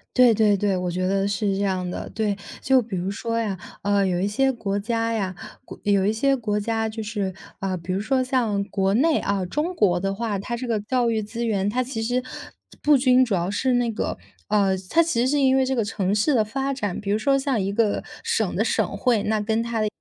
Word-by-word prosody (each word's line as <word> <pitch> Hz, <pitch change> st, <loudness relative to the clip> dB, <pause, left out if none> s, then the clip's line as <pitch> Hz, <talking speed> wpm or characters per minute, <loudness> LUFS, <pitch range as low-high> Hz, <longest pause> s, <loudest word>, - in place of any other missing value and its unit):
对 250 Hz, -2 st, +6 dB
对 210 Hz, -2 st, +3 dB
对， 200 Hz, -1 st, +1 dB
我 180 Hz, -1 st, -2 dB
觉 185 Hz, +1 st, -1 dB
得 195 Hz, 0 st, +1 dB
是 200 Hz, 0 st, 0 dB
这 200 Hz, -, -1 dB
样 185 Hz, -2 st, -1 dB
的。 -, -, -5 dB
对， 210 Hz, -2 st, -1 dB, 0.3 s
就 265 Hz, -1 st, +4 dB
比 215 Hz, -4 st, -6 dB
如 185 Hz, +2 st, -2 dB
说 230 Hz, +3 st, -3 dB
呀， 205 Hz, -4 st, -2 dB, 0.3 s
呃， 200 Hz, -1 st, +2 dB
有 180 Hz, -2 st, 0 dB
一 195 Hz, -, +1 dB
些 265 Hz, +6 st, +2 dB
国 205 Hz, -5 st, -2 dB
家 230 Hz, +2 st, -1 dB
呀， 190 Hz, -4 st, -2 dB, 0.3 s
国 -, -, -11 dB
有 200 Hz, -2 st, +2 dB
一 205 Hz, -, +3 dB
些 270 Hz, +5 st, +2 dB
国 210 Hz, -4 st, -1 dB
家 225 Hz, +1 st, -1 dB
就 220 Hz, 0 st, -5 dB
是， 205 Hz, -3 st, -3 dB, 0.3 s
啊， 190 Hz, -1 st, -2 dB
比 175 Hz, +2 st, -4 dB
如 190 Hz, -, 0 dB
说 255 Hz, +5 st, +1 dB
像 235 Hz, -6 st, 0 dB
国 195 Hz, -1 st, 0 dB
内 305 Hz, +5 st, +3 dB
啊， 195 Hz, -2 st, -1 dB
中 310 Hz, -, -2 dB
国 180 Hz, -, +3 dB
的 195 Hz, +1 st, -1 dB
话， 215 Hz, -2 st, -2 dB
它 235 Hz, +4 st, -4 dB
这 250 Hz, +1 st, -5 dB
个 225 Hz, -2 st, 0 dB
教 245 Hz, +2 st, +1 dB
育 220 Hz, -1 st, 0 dB
资 230 Hz, +3 st, -4 dB
源， 205 Hz, -3 st, 0 dB
它 250 Hz, +4 st, 0 dB
其 245 Hz, -3 st, -4 dB
实 245 Hz, +3 st, 0 dB, 0.6 s
不 295 Hz, -1 st, +5 dB
均， 255 Hz, 0 st, +5 dB
主 230 Hz, -6 st, 0 dB
要 175 Hz, +1 st, -1 dB
是 255 Hz, +5 st, +1 dB
那 245 Hz, -1 st, +1 dB
个 220 Hz, -, -3 dB, 0.3 s
呃， 200 Hz, -2 st, +2 dB
它 335 Hz, -, +4 dB
其 315 Hz, -8 st, 0 dB
实 250 Hz, -, +2 dB
是 290 Hz, +2 st, +2 dB
因 265 Hz, -1 st, +4 dB
为 265 Hz, -, +3 dB
这 265 Hz, +1 st, 0 dB
个 230 Hz, -4 st, 0 dB
城 200 Hz, -2 st, -1 dB
市 220 Hz, +8 st, +2 dB
的 230 Hz, -4 st, +4 dB
发 270 Hz, +6 st, -2 dB
展。 205 Hz, -8 st, -3 dB
比 200 Hz, -1 st, -3 dB
如 210 Hz, -, +1 dB
说 275 Hz, +5 st, +3 dB
像 270 Hz, -5 st, 0 dB
一 195 Hz, +1 st, -1 dB
个 210 Hz, 0 st, +1 dB, 0.2 s
省 460 Hz, 0 st, 0 dB
的 -, -, +2 dB
省 -, -, 0 dB
会， 240 Hz, -5 st, +2 dB
那 215 Hz, 0 st, 0 dB
跟 220 Hz, +2 st, 0 dB
它 230 Hz, -1 st, -2 dB
的 215 Hz, -, +1 dB
220 Hz, 265 characters per minute, -24 LUFS, 200-250 Hz, 0.6 s, 对